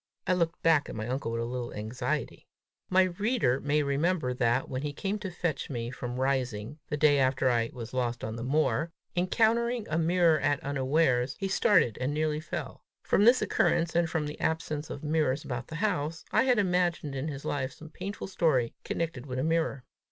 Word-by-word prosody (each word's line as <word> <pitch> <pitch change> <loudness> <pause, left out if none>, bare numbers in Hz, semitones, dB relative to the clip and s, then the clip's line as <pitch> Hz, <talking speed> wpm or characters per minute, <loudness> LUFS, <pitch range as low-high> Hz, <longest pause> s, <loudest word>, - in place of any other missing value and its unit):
I 185 - +2
looked 170 -2 0
back 160 -3 +4
at - - -6
my 110 0 -4
uncle 125 -2 -2
with 115 0 -2
a - - -1
little 120 0 -4
anxiety. 110 +4 -3 0.4
My 185 0 +5
reader 185 - +1
may 145 +1 +1
remember 145 0 0
that, 125 +1 +1
when 130 0 -3
he 145 0 -3
came 200 +7 -2
to 190 - -4
fetch 170 -4 -3
me 120 -3 -3
from 125 -1 -5
Rising, 130 -1 -1
the 150 - -1
day 145 -1 +4
after 130 0 +2
I 115 -1 +1
was 120 -1 -8
lost 120 -1 -1
on 110 0 -3
the 115 - -6
moor, 150 +2 +1 0.2
encountering 225 +5 +2
a 160 - +1
mirror 170 -1 +3
at 145 -1 +1
unawares, 135 -1 +1
he 195 - -1
started 190 - +3
and 140 +3 -1
nearly 155 0 0
fell: 155 - -6 0.2
from 205 - +3
this 245 +2 +6
occurrence, 165 -1 +1
and 170 -1 +2
from 160 -2 -1
the 150 +1 -6
absence 155 -2 -2
of 140 - -7
mirrors 150 -3 0
about 120 -2 -4
the 155 - -7
house, 160 -4 -1
I 225 +4 +3
had 250 -2 +3
imagined 180 -6 +1
in 135 +2 -3
his 140 -2 -6
life 135 -2 -1
some 155 +3 -13
painful 195 +5 -6
story 150 -11 +1
connected 160 -6 -3
with 130 -1 -4
a 130 - 0
mirror. 160 -5 0
150 Hz, 200 wpm, -29 LUFS, 130-170 Hz, 0.4 s, this